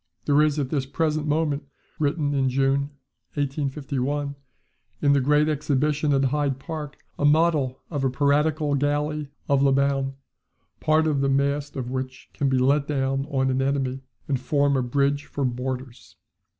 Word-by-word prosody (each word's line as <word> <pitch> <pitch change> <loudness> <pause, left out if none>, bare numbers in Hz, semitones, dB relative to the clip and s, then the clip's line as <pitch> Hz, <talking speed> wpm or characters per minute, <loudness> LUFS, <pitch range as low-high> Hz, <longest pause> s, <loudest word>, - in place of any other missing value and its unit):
[There 145 0 +4
is 150 -1 +2
at 140 -3 -2
this 135 -3 -1
present 155 +1 -1
moment 150 -1 0 0.4
[written 145 -1 0
in 135 -2 +2
June, 135 +2 +1 0.5
1851] 140 0 -2 0.7
in 140 -1 +3
the 140 - +3
Great 150 +3 +3
Exhibition 150 0 +1
at 135 -1 +3
Hyde 140 0 0
Park 150 0 -6 0.2
a - - -1
model 145 -3 +3
of 145 -4 -2
a 135 - +3
piratical 145 +2 +1
galley 145 +1 0 0.2
of 140 -2 +3
Labuan, 135 0 +2 0.6
part 155 +1 +3
of 150 -3 +1
the 140 - +2
mast 140 +1 0
of 125 -2 -4
which 130 0 -5
can 140 - 0
be 130 - +2
let 140 +3 +2
down 135 -1 -1
on 130 -1 +1
an 130 +1 0
enemy, 135 -1 -1 0.3
and 135 -3 0
form 140 +1 +1
a 130 - +2
bridge 140 +3 0
for 140 - -3
boarders. 125 0 -5
140 Hz, 160 wpm, -24 LUFS, 135-150 Hz, 0.7 s, There